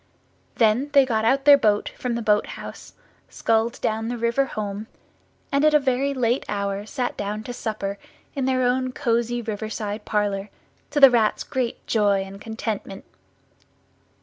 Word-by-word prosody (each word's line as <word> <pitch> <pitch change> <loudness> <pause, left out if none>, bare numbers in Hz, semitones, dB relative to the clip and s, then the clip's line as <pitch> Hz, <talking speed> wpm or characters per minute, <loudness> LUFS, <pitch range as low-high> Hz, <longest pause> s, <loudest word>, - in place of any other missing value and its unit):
Then 230 +5 +2
they 275 -2 +6
got 220 -3 0
out 270 +4 +2
their 285 -1 +8
boat 210 -4 +2
from 245 -2 -4
the 235 - -3
boat 210 -1 +2
house, - - -10 0.4
sculled 225 +1 0
down 220 +1 -1
the 240 +1 -3
river 235 +4 +1
home, 210 -3 -5 0.6
and 280 +1 +2
at 305 0 +5
a - - +7
very 270 0 0
late 250 -2 0
hour 200 0 -2
sat 250 0 -3
down 210 +1 -4
to 245 - -6
supper 200 -4 -4 0.3
in 270 -2 -2
their 260 -1 +1
own 255 +1 0
cosy 235 0 0
riverside 215 -1 -4
parlour, 205 -1 -1 0.4
to 295 - 0
the 275 -2 +9
Rat's 225 -3 +2
great 255 -3 -3
joy 205 -3 +2
and 195 +1 -11
contentment. 220 -3 -5
225 Hz, 160 wpm, -23 LUFS, 210-255 Hz, 0.6 s, the